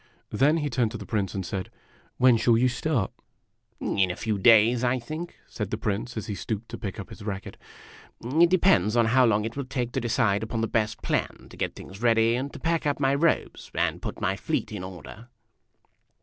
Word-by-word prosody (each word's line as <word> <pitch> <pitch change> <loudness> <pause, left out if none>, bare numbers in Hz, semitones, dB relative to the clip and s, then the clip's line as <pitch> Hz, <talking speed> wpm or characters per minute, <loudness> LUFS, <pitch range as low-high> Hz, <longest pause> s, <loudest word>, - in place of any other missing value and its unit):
Then 140 +9 +3
he 150 -2 -1
turned 120 -2 +1
to - - -4
the 105 - -9
Prince 100 -1 -2
and 95 -2 -3
said, 95 +2 -4 0.5
"When 125 -1 +6
shall 115 0 +3
you 125 +2 +4
start?" 125 -3 -1 0.4
" - - -45
In 95 -2 +1
a 90 - -3
few 110 -1 -2
days, 115 +3 +5
I 125 +1 +2
think," 155 +8 -6
said 105 -4 -5
the 105 - -2
Prince, 110 +2 -3
as 110 - -3
he 105 - -4
stooped 110 +2 -4
to 115 - -6
pick 105 -2 -5
up 100 - -7
his - - -11
racket. 100 -2 -5 0.7
"It 160 +8 +4
depends 145 - +3
on 120 -1 +4
how 130 -1 +6
long 105 -1 +2
it 115 - -5
will 140 - -3
take 125 -2 -3
to 130 - -2
decide 110 -3 +1
upon 110 0 -3
the 115 - 0
best 110 -1 -1
plan, - - -2
to - - -11
get - - -3
things 95 +3 -11
ready, 115 -1 +4
and 130 +3 -2
to - - -9
pack 165 -2 0
up 145 - 0
my 135 -1 +2
robes, 155 +3 0
and - - 0
put - - -5
my - - 0
fleet - - -2
in 105 -4 -5
order." 95 +5 -10
115 Hz, 220 wpm, -26 LUFS, 105-130 Hz, 0.7 s, When